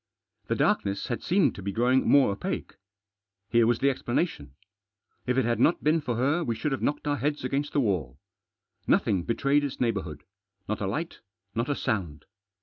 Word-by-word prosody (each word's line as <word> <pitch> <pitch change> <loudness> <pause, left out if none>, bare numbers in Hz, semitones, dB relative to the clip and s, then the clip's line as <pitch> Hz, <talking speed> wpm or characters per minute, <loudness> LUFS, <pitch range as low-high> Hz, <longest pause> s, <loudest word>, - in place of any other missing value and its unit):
The - - 0
darkness 100 0 0
had 120 -3 -2
seemed 190 +3 +2
to - - -9
be 100 +1 -3
growing 125 +5 +2
more 140 -7 +5
opaque. 100 - -4 0.8
Here 115 -1 +4
was 120 -1 +3
the 140 - +2
explanation. 120 - -2 0.7
If 125 +1 +1
it 130 - +3
had 120 0 0
not 165 - +3
been 155 +2 +3
for 120 -4 -2
her 145 +8 +1
we 115 -5 -1
should 145 +7 -2
have 135 - -2
knocked 145 +1 -1
our 145 0 +1
heads 145 0 -2
against 140 +3 -1
the 145 - +3
wall. 85 - -1 0.7
Nothing 95 - +2
betrayed 140 +8 +1
its 140 - -4
neighbourhood; 95 - -2 0.4
not 105 +1 -3
a 100 - -1
light, 160 - -4 0.3
not 115 +5 -1
a 145 - +1
sound. 90 - -3
120 Hz, 185 wpm, -27 LUFS, 100-145 Hz, 0.8 s, more